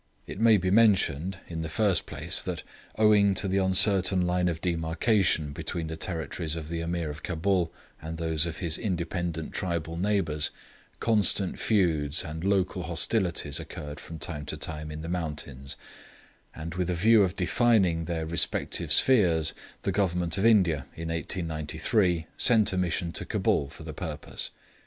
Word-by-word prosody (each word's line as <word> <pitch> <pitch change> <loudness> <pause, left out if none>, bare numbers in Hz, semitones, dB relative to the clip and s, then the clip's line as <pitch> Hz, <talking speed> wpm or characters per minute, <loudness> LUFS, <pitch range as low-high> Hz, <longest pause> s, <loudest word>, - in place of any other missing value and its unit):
It - - -8
may 110 -1 +6
be 95 0 -1
mentioned, 95 -5 +3
in 80 -1 -5
the 80 - -4
first 100 +2 +1
place, - - -1
that - - -5 0.3
owing 105 -2 +4
to 100 - +1
the 95 +1 +1
uncertain 95 -1 +4
line 90 0 +1
of 85 -2 -2
demarcation 85 -1 0
between 80 +2 -4
the 80 0 -5
territories 80 -1 -3
of 80 -1 -6
the 85 0 -3
Ameer 85 -2 -2
of 75 +2 -10
Cabul 90 0 0 0.3
and 80 +1 -6
those 80 -1 +1
of 80 - -5
his 85 -3 -1
independent 85 -4 -3
tribal 85 -3 -3
neighbours, 85 -6 +1 0.5
constant 105 -4 +1
feuds 80 -9 +1
and 80 +2 -6
local 95 -1 +1
hostilities 85 +2 0
occurred 75 0 -8
from 80 - -9
time 75 0 -5
to - - -5
time 75 -1 -6
in 75 +1 -7
the - - -6
mountains; 75 -6 -5 0.8
and 80 +1 -6
with 90 0 -2
a 90 - 0
view 110 +5 +5
of 95 -1 +1
defining 95 -4 +2
their 80 -2 -3
respective 85 +1 -1
spheres, 90 - +5 0.3
the - - 0
Government 90 -4 0
of 95 - -1
India, 90 - +3
in 80 0 -5
1893, 80 +2 -1
sent 110 -5 +4
a - - -1
Mission 90 -1 -1
to - - -2
Cabul 70 - 0
for 80 - -12
the 80 -1 -7
purpose. 75 -2 -5
85 Hz, 160 wpm, -27 LUFS, 80-95 Hz, 0.8 s, may